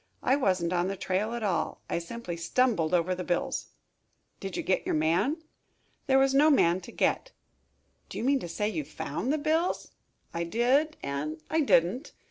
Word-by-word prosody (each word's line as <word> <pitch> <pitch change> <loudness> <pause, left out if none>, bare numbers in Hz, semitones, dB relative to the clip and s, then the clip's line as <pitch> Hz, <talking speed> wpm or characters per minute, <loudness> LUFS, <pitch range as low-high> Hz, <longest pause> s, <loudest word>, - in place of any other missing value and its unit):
I 265 - +4
wasn't 185 -9 +1
on 175 0 +1
the 195 - -2
trail 205 +6 -1
at 235 - -4
all. 180 -6 -1
I - - -1
simply 175 +1 -6
stumbled 170 0 +1
over 180 0 +2
the 180 0 -4
bills." 175 0 -1 0.7
"Did 195 -2 -5
you - - -2
get 190 - +1
your - - -1
man?" 185 - +1 0.6
"There 265 -1 +4
was 270 0 +4
no 295 +3 +6
man 180 - +4
to - - -10
get." - - 0 0.8
"Do - - -7
you - - -3
mean 275 +2 +3
to 175 - -7
say 210 +5 -1
you 170 -8 -2
found 150 - -4
the 310 - +1
bills?" 320 +4 0 0.4
"I 170 0 -1
did 255 - +1
and 150 +3 -3
I 320 - +2
didn't. 245 - +2
195 Hz, 185 wpm, -28 LUFS, 170-270 Hz, 0.8 s, no